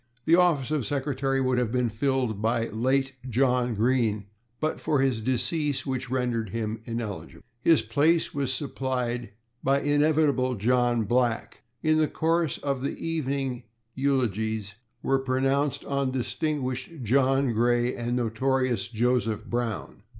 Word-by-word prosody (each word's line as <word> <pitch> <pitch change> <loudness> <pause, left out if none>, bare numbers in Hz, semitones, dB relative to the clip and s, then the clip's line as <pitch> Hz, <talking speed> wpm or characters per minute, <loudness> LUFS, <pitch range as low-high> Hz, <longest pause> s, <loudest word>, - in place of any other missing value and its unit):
The 165 - +3
office 170 -6 +4
of 150 -4 +1
secretary 135 +1 -1
would 130 -1 +2
have 120 -3 0
been 125 -1 +1
filled 120 -2 -1
by 115 +1 +1
late 130 +5 0 0.2
John 125 -1 +2
Green, 110 -2 +1 0.3
but 155 0 -2
for 155 -3 +1
his 130 -4 +1
decease, 140 +4 -1
which 130 -2 -3
rendered 120 -4 -1
him 110 +1 -3
ineligible. 115 -4 -5 0.2
His 165 +2 +4
place 160 +3 +2
was 140 -2 -1
supplied 130 -3 -2 0.3
by 135 +1 +2
inevitable 145 -3 +2
John 120 +2 +2
Black. 120 +1 0 0.2
In 155 0 +3
the 155 - +3
course 165 -1 0
of 140 -3 -2
the 140 - -3
evening 140 -6 -2 0.3
eulogiums 110 -6 0 0.3
were 135 0 +2
pronounced 135 +2 0
on 140 -1 0
distinguished 130 +1 -3
John 135 +2 +2
Gray 120 +2 +2
and 120 +1 -2
notorious 125 -2 0
Joseph 115 -2 0
Brown. 120 -5 -3
130 Hz, 135 wpm, -27 LUFS, 120-140 Hz, 0.3 s, office